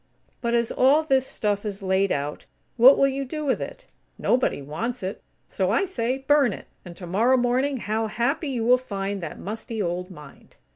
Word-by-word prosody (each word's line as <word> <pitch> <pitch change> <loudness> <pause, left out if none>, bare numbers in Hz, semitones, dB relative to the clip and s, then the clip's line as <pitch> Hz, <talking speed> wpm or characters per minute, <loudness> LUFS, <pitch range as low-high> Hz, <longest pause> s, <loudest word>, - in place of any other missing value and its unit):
But, 235 -2 0
as 235 -1 +1
all 280 +5 +4
this 265 -3 +2
stuff 205 -1 -1
is 200 -2 -5
laid 190 +1 +1
out, 145 +1 -3 0.3
what 250 +3 +8
will 275 - +4
you 275 0 -2
do 305 +3 -5
with 265 - 0
it? - - -7 0.3
Nobody 250 - +1
wants 190 - -4
it. 190 +2 -4 0.3
So 185 -1 -1
I 230 - +2
say, 255 -8 -2
burn 285 -7 +4
it, - - -10 0.2
and 175 -2 -11
tomorrow 210 +9 +2
morning, 255 +3 +1
how 220 -1 -2
happy 260 +8 -1
you 240 -4 -2
will 250 +1 +5
find 200 -4 -4
that 165 -3 -6
musty 220 +2 -6
old 180 -1 -2
mind!" 150 -6 -14
230 Hz, 190 wpm, -24 LUFS, 195-260 Hz, 0.3 s, what